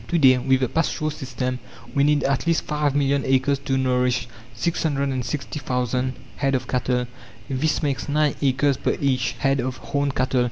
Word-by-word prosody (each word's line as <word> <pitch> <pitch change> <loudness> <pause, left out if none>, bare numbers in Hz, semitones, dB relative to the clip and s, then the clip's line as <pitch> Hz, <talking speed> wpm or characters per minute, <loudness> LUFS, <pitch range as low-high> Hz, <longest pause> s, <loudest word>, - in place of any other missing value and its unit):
To 175 - +1
day, 130 -4 +6
with 130 +1 +2
the 130 - +2
pasture 155 +1 -1
system, 130 -3 -3 0.3
we 140 - +3
need 150 0 +3
at 140 +4 0
least 165 -1 +2
five 150 -2 0
million 140 -1 +2
acres 135 +1 +2
to 135 -1 -1
nourish 125 -2 +1 0.3
660,000 130 -3 -1 0.2
head 135 -1 +1
of 130 - -2
cattle. 125 -1 0 0.4
This 145 +4 0
makes 140 -1 -1
nine 150 0 +2
acres 140 0 +2
per - - -1
each 130 -3 +1
head 135 +3 +1
of 130 0 -2
horned 140 +2 -2
cattle. 130 0 +1
135 Hz, 165 wpm, -23 LUFS, 130-145 Hz, 0.4 s, day